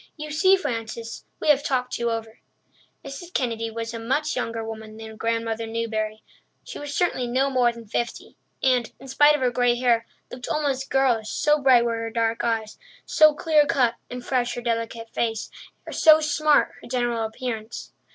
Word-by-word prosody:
You 305 0 -6
see, 375 +6 +4
Frances, 230 -7 -5
we - - -1
have 290 -2 +5
talked 250 -3 -1
you 235 0 0
over." 225 -1 -5 0.7
Mrs. 305 +6 -8
Kennedy 230 -3 -1
was 230 +1 -5
a 230 - -5
much 270 +7 -1
younger 230 -1 -3
woman 220 -1 -8
than 220 0 -9
Grandmother 230 0 -2
Newbury. 220 -1 -3 0.4
She - - -8
was 290 0 -6
certainly 285 -6 0
no 265 +3 +1
more 250 -2 +3
than 235 -1 -12
fifty 235 +3 -4 0.3
and, 250 -3 +2
in 270 - -12
spite 290 +3 +5
of 295 - -3
her 250 -1 +2
grey 245 0 +2
hair, 240 -2 +1 0.2
looked 250 0 -7
almost 275 -3 -1
girlish, 245 -5 +2
so 300 -1 +2
bright 255 -3 +5
were 230 -1 -1
her 225 0 -3
dark 225 0 -1
eyes, 225 -2 -2 0.3
so 310 -1 +5
clear 300 -1 +3
cut 260 -6 +2 0.2
and 245 0 -7
fresh 245 -2 0
her 245 - -5
delicate 230 -1 -3
face, 225 -2 -2 0.3
and - - -7
so 310 -1 +7
smart 305 -1 +2
her - - -12
general 240 -2 -1
appearance. 225 0 -5
240 Hz, 180 wpm, -24 LUFS, 230-270 Hz, 0.7 s, so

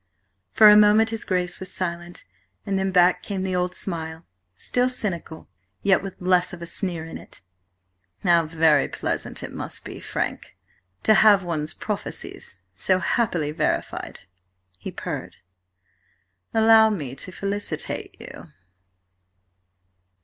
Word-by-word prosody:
For 215 - +7
a 210 - +9
moment 210 +2 +5
his 225 - -1
Grace 180 -2 -2
was 185 - -4
silent, 175 -1 -4 0.4
and 195 -1 -1
then 190 0 0
back 180 -1 +4
came 195 -2 -4
the 190 -1 -2
old 180 0 -1
smile, 160 -3 -3 0.3
still 245 - 0
cynical, 185 -10 -4 0.4
yet 195 -2 +4
with 195 -1 -8
less 180 0 +2
of 180 - -8
the 170 - -7
sneer 170 -2 -1
in 165 - -8
it. - - -10 0.8
"How 170 -2 +4
very 160 -2 +3
pleasant - - -4
it - - -6
must - - -6
be, - - -8
Frank, - - -4 0.5
to 215 - +5
have 205 -2 +6
one's 155 -3 -2
prophecies 90 - -5
so 185 - +2
happily 175 -5 0
verified!" 155 - -2 0.6
he - - -6
purred. - - -6 1.1
"Allow 220 0 +6
me 150 - -4
to - - -6
felicitate 200 +2 -3
you!" - - -10
185 Hz, 135 wpm, -24 LUFS, 170-205 Hz, 1.1 s, a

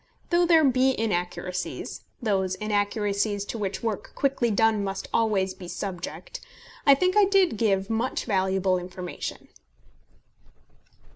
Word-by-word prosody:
Though 345 0 +4
there 325 -2 +6
be 260 -2 +3
inaccuracies, 180 -3 -3 0.2
those 190 -4 +1
inaccuracies 205 0 0
to 225 - -5
which 195 0 -3
work 220 -3 -3
quickly 270 -4 +1
done 220 0 +2
must 195 0 -4
always 200 -4 +1
be 180 - -10
subject, 190 - -6 0.5
I 280 - +9
think 365 +6 +1
I 420 -1 +6
did 385 - +3
give 195 -3 +1
much 225 +3 -1
valuable 190 -2 +1
information. 180 0 -7
205 Hz, 125 wpm, -26 LUFS, 190-245 Hz, 0.5 s, I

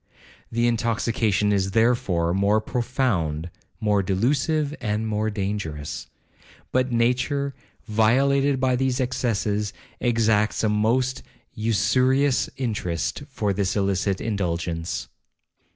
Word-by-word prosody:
The 115 +1 +1
intoxication 115 -3 +1
is, 95 -1 0
therefore, 105 -8 +2
more 100 +3 +3
profound, 110 - -1 0.3
more 105 -2 +2
delusive, 140 - 0
and 110 -1 -1
more 110 0 0
dangerous. 95 -8 -4 0.6
But 130 0 +1
nature, 125 +4 +1 0.3
violated 135 +5 +3
by 130 -1 +2
these 130 0 0
excesses, 110 -5 -1 0.3
exacts 110 -3 +2
a 110 - +3
most 120 +5 +1 0.3
usurious 130 +5 +2
interest 110 - -2
for 105 -7 -1
this 95 -1 -1
illicit 100 -1 0
indulgence. 85 -5 -2
110 Hz, 100 wpm, -24 LUFS, 100-125 Hz, 0.6 s, more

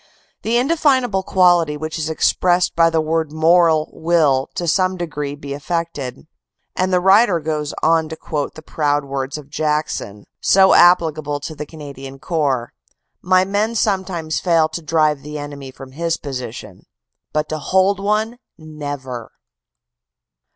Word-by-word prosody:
The 230 +2 +1
indefinable 260 -7 +2
quality 175 -5 +3
which 155 +2 -5
is 155 0 -2
expressed 175 +2 +1
by 165 0 +5
the 165 -1 +1
word 160 -1 -1
moral 160 0 +3
will 160 -5 +2
to 175 - -3
some 185 +3 +1
degree 150 -4 -4
be 140 -1 -7
affected. 155 -3 -4 0.3
" - - -54
And 185 +1 0
the 180 - +3
writer 190 0 +4
goes 150 -1 -3
on 160 -1 +3
to 160 - -5
quote 150 -2 -4
the 155 - -11
proud 145 -2 0
words 135 0 -4
of 145 -1 -12
Jackson, 150 -9 -2 0.2
so 190 0 +5
applicable 155 -4 +4
to 155 - -6
the 150 -1 -7
Cana 150 -3 -9
dian 135 0 -10
Corps: 140 -6 -1 0.5
"My 185 0 +3
men 210 +4 -1
sometimes 190 -7 -1
fail 165 -3 +3
to 160 +2 -5
drive 155 -2 +1
the 150 +1 -7
enemy 145 -2 -7
from 130 0 -12
his 165 +3 -2
position, 130 -4 -8 0.4
but 150 0 -1
to 155 - -3
hold 190 +5 +2
one, 215 +4 -1 0.2
never!" 145 -6 -7
160 Hz, 150 wpm, -19 LUFS, 145-180 Hz, 0.5 s, by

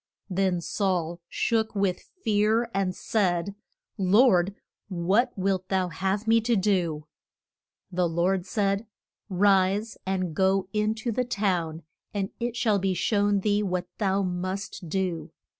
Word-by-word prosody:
Then 185 -1 +1
Saul 175 -3 -1
shook 220 -2 0
with 195 -2 -1
fear 220 +2 +2
and 190 -2 0
said, 190 -3 0 0.5
Lord, 195 -1 +4 0.3
what 190 +6 +1
wilt 190 -1 -1
thou 185 -2 +1
have 190 +5 -2
me 225 0 +5
to 235 +1 +1
do? 180 -7 +1 0.9
The 180 -1 +1
Lord 180 +3 0
said, 200 +1 0 0.4
Rise, 195 +2 +2
and 185 -3 -1
go 190 +1 +2
in 210 +1 +1
to 230 +2 -3
the 250 +3 0
town, 180 -8 -1 0.3
and 195 -1 -1
it 240 0 -2
shall 215 -4 +2
be 190 -1 0
shown 205 +2 +2
thee 205 +1 +2
what 180 -3 -2
thou 195 -1 +1
must 185 0 -4
do. 180 -2 -2
195 Hz, 135 wpm, -27 LUFS, 180-210 Hz, 0.9 s, me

